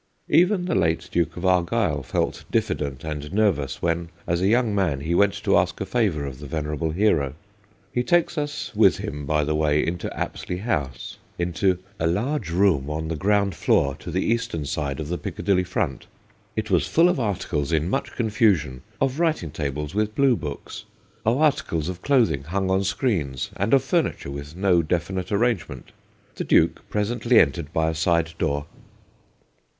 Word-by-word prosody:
Even 180 +1 +4
the 175 - -1
late 85 +1 +1
Duke 85 -1 0
of 90 - -4
Argyll 90 -3 +2
felt 60 - -2
diffi - - +1
dent 70 -3 -5
and 75 -1 -5
nervous 95 -10 0
when, 85 0 0 0.2
as 85 0 0
a 95 - +3
young 115 0 +2
man, 85 -9 0
he 80 +4 -1
went 100 +3 +3
to - - +3
ask - - +1
a - - -2
favour 95 -8 0
of 65 -2 -7
the 75 - -8
venerable 75 +1 -2
hero. 80 -6 +1 0.6
He 125 - 0
takes 175 +6 +2
us 145 -2 -3
with - - +5
him, 75 -1 -5
by 75 0 +2
the 75 +1 0
way, 75 -1 +2
into 85 +1 -3
Apsley 90 - -3
House, 75 - -3 0.2
into 90 +2 +1 0.2
'a 80 - +1
large 105 - -1
room 85 -6 +2
on 80 +1 -3
the 80 - -2
ground 100 +3 +2
floor, 70 -3 +2
to 75 +3 -9
the 90 +3 -1
eastern 115 -10 -1
side 70 -1 -3
of 75 - -4
the 85 +2 -3
Picca - - -6
dilly 95 -2 +3
front. 90 -6 -3 0.5
It - - -3
was - - +3
full 165 +2 +4
of 180 -5 +1
articles 90 - -1
in 80 0 +1
much - - -2
confusion 105 - +1 0.2
of 135 +2 0
writing 160 - 0
tables 75 0 -4
with 105 +1 -1
blue 135 -3 +4
books, 75 0 -7 0.4
of 115 +3 +3
articles 115 - +1
of 90 -1 -6
clothing 110 - +2
hung 95 +3 -1
on 95 +1 +2
screens, 90 - -1
and 100 +4 -1
of 135 - +5
furniture 165 - -1
with 70 +2 -7
no 90 -2 +3
definite 90 +3 -2
arrangement. 100 - -1 0.4
The - - -4
Duke - - +2
presently 115 +3 +2
entered 75 +1 +1
by 80 -1 +1
a - - -5
side 85 0 +1
door. 75 -2 0
85 Hz, 180 wpm, -24 LUFS, 75-105 Hz, 0.6 s, with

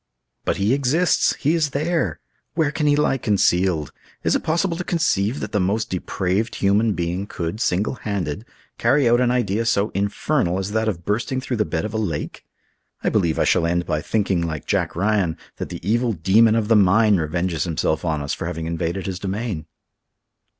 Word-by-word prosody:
"But - - 0
he 100 +5 +2
exists! 140 +6 +2
he 150 +3 +1
is 160 -3 +1
there! 155 - -1 0.4
Where 155 -3 +2
can 150 0 -1
he 145 - +4
lie 145 -2 +1
concealed? 90 - +1 0.3
Is - - +2
it - - +1
possible 170 +2 0
to 180 - -3
conceive 135 - 0
that 105 - -4
the 105 - +1
most 100 +4 0
depraved 95 +4 -1
human 105 +3 +2
being 90 +3 -2
could, 85 +5 -4
single 100 0 +1
handed, 100 -3 -3 0.4
carry 130 +3 +3
out 120 +1 +4
an 125 - +3
idea 115 -3 +1
so 110 -2 +1
infernal 100 - 0
as 95 +1 -3
that 110 +1 0
of 85 -6 -3
bursting 115 +5 -1
through 130 -2 -3
the 105 - +1
bed 80 -3 -2
of 105 - -5
a - - -1
lake? 85 -9 -4 0.6
I - - +2
believe 85 -6 +1
I - - +3
shall 85 - +2
end 85 +1 0
by 75 - -1
thinking, 100 -4 0
like 80 -3 -3
Jack - - -1
Ryan, 95 -2 +1 0.2
that - - -5
the 85 - -7
evil 120 +2 +2
demon 105 +6 +4
of 110 -2 0
the 115 - +4
mine 105 +1 +5
revenges 85 +1 -1
himself 80 -2 -1
on 80 -4 -1
us 70 - -2
for - - -4
having 80 -2 -4
invaded 85 +3 -2
his 95 -1 -4
domain." 100 -4 -3
100 Hz, 195 wpm, -22 LUFS, 85-115 Hz, 0.6 s, mine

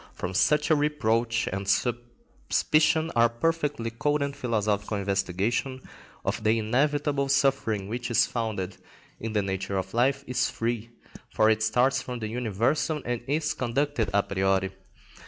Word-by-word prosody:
From 90 - -4
such 150 - +2
a - - +7
reproach 120 -6 +1
and 100 0 -4
suspicion 130 +7 0
our 120 0 +5
perfectly 145 -2 -1
cold 145 +5 0
and 140 0 -3
philosophical 105 -3 -1
investigation 100 +6 -1 0.5
of - - -2
the 110 +1 +3
inevitable 140 +5 +1
suffering 135 -7 +1
which 120 +3 -4
is 115 -1 +4
founded 100 -6 -3 0.4
in 115 -1 -4
the 105 -2 +1
nature 95 0 -2
of 95 0 -4
life 135 +4 +2
is 125 0 0
free, 115 0 -3 0.4
for 110 +1 +3
it 110 0 +1
starts 125 +5 +2
from 125 -1 -5
the 110 -2 -4
universal 125 - 0
and 120 -1 -2
is 150 +2 0
conducted 125 -2 -1
a 100 0 +3
priori. 95 0 0
120 Hz, 145 wpm, -27 LUFS, 105-140 Hz, 0.5 s, a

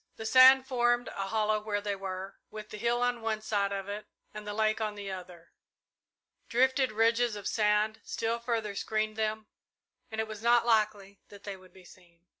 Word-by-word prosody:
The 220 - -8
sand 260 +2 +7
formed 240 -2 +1
a 195 0 -4
hollow 215 0 +1
where 210 -1 -2
they 205 0 -3
were, 190 0 -6
with 215 0 -9
the 210 - -7
hill 240 +2 +1
on 245 -1 0
one 220 -1 -1
side 205 -2 -1
of 195 -1 -4
it 205 +1 -6 0.3
and 210 0 -8
the 205 - -3
lake 215 0 +1
on 215 -1 -2
the 200 -1 -6
other. 180 -2 -10 1.0
Drifted 260 +1 +2
ridges 230 +1 +2
of 205 -1 -5
sand 210 0 +1
still 230 +1 -2
further 230 -3 -2
screened 215 +1 -2
them, 220 0 -2 0.6
and 220 -1 -6
it 220 - -1
was 215 -1 -8
not 235 0 +4
likely 210 -3 +1
that 200 -1 -14
they 200 -1 -5
would 185 -1 -17
be 185 -1 -17
seen. 175 -1 -20
215 Hz, 195 wpm, -30 LUFS, 200-230 Hz, 1.0 s, sand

